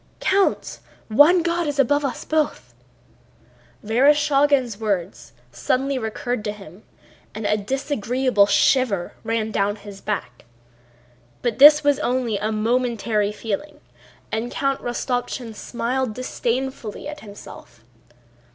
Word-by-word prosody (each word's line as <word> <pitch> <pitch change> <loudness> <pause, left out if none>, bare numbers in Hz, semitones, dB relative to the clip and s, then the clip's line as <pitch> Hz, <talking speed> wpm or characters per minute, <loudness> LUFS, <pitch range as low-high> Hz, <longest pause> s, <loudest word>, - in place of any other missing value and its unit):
"Count! 390 +1 +1 0.3
One 305 +10 +5
God 340 -1 0
is 290 -1 -3
above 285 +2 +2
us 275 - -3
both!"—Vereshchágin's 280 -3 -1
words 195 -4 -3 0.2
suddenly 255 - -1
recurred 240 +1 -3
to 210 - -1
him, 195 -2 -13 0.5
and 215 0 -5
a 210 - +2
disagreeable 250 -1 0
shiver 200 -2 +2
ran 225 -1 -1
down 205 0 0
his 205 -2 -12
back. 155 - -5 1.0
But 240 0 -1
this 300 +2 +9
was 285 -1 +3
only 245 -5 -1
a 215 +2 -1
momentary 220 -2 0
feeling 220 +7 -5 0.5
and 225 +2 -2
Count 275 +1 -1
Rostopchín 245 -1 -3
smiled 240 +2 -3
disdainfully 255 -2 -3
at 300 0 -7
himself. 200 - -13
240 Hz, 110 wpm, -22 LUFS, 210-275 Hz, 1.0 s, this